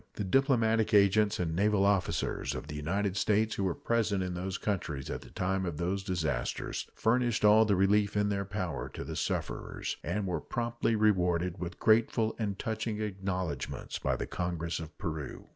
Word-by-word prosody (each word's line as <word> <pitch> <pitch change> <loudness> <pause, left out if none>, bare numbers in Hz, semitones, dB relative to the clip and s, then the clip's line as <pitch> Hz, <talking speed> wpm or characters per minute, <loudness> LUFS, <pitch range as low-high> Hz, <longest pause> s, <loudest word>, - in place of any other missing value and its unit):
The - - -2
diplomatic 115 -1 +3
agents 105 +1 +4
and 80 -3 -1
naval 100 +1 +3
officers 100 -2 0
of - - -5
the 75 0 -7
United 95 +6 -1
States 110 +1 +2
who 100 - -2
were 90 - 0
present 110 -5 0
in 90 -1 -3
those 95 +2 -3
countries 80 -9 -3
at - - -4
the - - -13
time 95 +1 -1
of 85 -5 -3
those 95 +3 -1
disasters 80 -10 -2
furnished 120 -1 +2
all 110 +1 +7
the 105 -2 +3
relief 100 +2 +3
in 105 0 +2
their 100 -1 0
power 100 -3 -4
to - - -4
the - - -6
sufferers, - - -3
and 100 +4 -1
were 90 -2 -2
promptly 120 -1 -1
rewarded 90 -4 +2
with 90 0 -5
grateful 110 0 +3
and 100 -3 -2
touching 110 0 -3
acknowledgments 95 -7 -3
by - - 0
the - - -3
Congress 85 -1 -3
of 80 -1 -9
Peru. 75 -3 -5
100 Hz, 175 wpm, -31 LUFS, 90-110 Hz, -, all